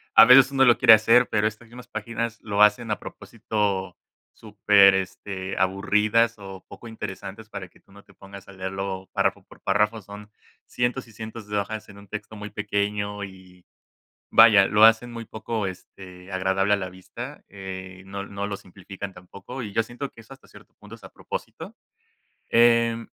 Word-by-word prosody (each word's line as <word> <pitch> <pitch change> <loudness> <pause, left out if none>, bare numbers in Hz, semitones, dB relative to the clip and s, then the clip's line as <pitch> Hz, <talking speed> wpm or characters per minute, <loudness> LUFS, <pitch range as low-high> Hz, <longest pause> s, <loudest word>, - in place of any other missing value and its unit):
A - - +10
veces 135 +3 +7
uno 135 -1 +3
lo 120 -2 +5
quiere 110 - +8
hacer, 115 +3 +5
pero 105 0 +1
estas 110 +2 -8
mismas 125 +1 -13
páginas 115 +1 -4
lo 105 -1 -1
hacen 105 +1 +3
a - - -1
propósito 95 -4 -4 0.4
súper, 100 -2 +4
este, 95 0 -5
aburridas 105 +5 +2
o 95 -2 -11
poco 120 - -12
interesantes 105 0 -8
para 95 -3 -7
que - - -25
tú - - -27
no 100 +1 -16
te - - -22
pongas 100 -1 -13
a 100 - -13
leerlo 95 0 -5
párrafo - - 0
por - - -19
párrafo. 105 +3 0
Son 105 +2 -12 0.4
cientos 120 +1 -2
y - - -16
cientos 110 0 -9
de 105 0 -2
hojas 110 +1 -4
en 100 - -13
un 100 0 -15
texto 105 +2 -8
muy 105 0 -7
pequeño 105 0 -2
y 95 -2 -13 0.7
vaya, 110 -4 +8
lo 105 +1 +6
hacen 115 +2 +4
muy 115 -1 -7
poco, 110 -2 -4
este, 90 0 -11
agradable 95 +2 +1
a - - +3
la 95 -2 -5
vista, 120 +10 -10
eh, 95 -1 -9
no 100 +1 -6
no 100 0 -5
lo 100 - -4
simplifican 95 +1 -10
tampoco. 100 +8 -10
Y 105 -4 -7
yo 115 - +2
siento 120 +5 -7
que 115 - -16
eso 115 - -14
hasta 135 - -19
cierto - - -18
punto - - -12
es - - -21
a - - -11
propósito, - - -8 0.7
eh, 115 -1 +3
105 Hz, 185 wpm, -24 LUFS, 95-115 Hz, 0.7 s, A